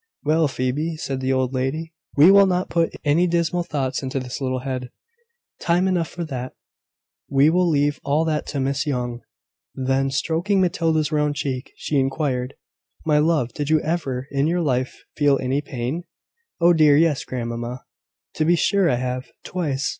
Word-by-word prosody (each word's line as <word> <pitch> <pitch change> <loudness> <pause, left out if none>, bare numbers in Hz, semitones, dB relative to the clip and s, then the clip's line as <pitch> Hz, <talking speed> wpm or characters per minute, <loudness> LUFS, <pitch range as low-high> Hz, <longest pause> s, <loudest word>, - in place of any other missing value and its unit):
"Well, 155 +1 +3
Phoebe," 140 +5 -2
said 135 -3 -3
the 130 0 0
old 130 0 0
lady, 145 +6 -2 0.2
"we 155 +6 +8
will 200 0 +7
not 180 0 -1
put 165 -1 +1
any 160 +5 +3
dismal 170 0 +1
thoughts 140 -6 -2
into 135 0 -3
this 125 +1 -6
little 130 -1 -1
head: 130 -2 -4 0.7
time 175 +2 +2
enough 175 -3 +1
for 175 +1 -6
that: 130 -4 -5 0.8
we 140 +3 +4
will 180 0 +2
leave 145 -1 +1
all 145 +3 +1
that 155 -2 -1
to 145 - -3
Miss 140 +2 -1
Young." 125 -3 -2 0.5
Then, 135 +1 0
stroking 170 +8 0
Matilda's 165 -4 +1
round 150 -1 +1
cheek, 130 -3 -3
she 145 - -1
inquired, 135 -1 -1 0.5
"My 150 -2 +3
love, 150 -6 +1
did 145 -1 -3
you 155 0 +4
ever 135 -6 -2
in 140 +1 +1
your 175 +2 +1
life 130 -4 -1
feel 145 -2 +3
any 135 +3 -1
pain?" 135 +5 -4 0.5
"Oh, 175 0 +5
dear, 155 -3 +5
yes, 155 -3 +2
grandmamma: 120 0 -5 0.5
to - - 0
be 175 +2 +4
sure 195 +1 +2
I 125 - +2
have; 125 +1 -3 0.2
twice. 150 -7 -2
145 Hz, 170 wpm, -22 LUFS, 130-165 Hz, 0.8 s, we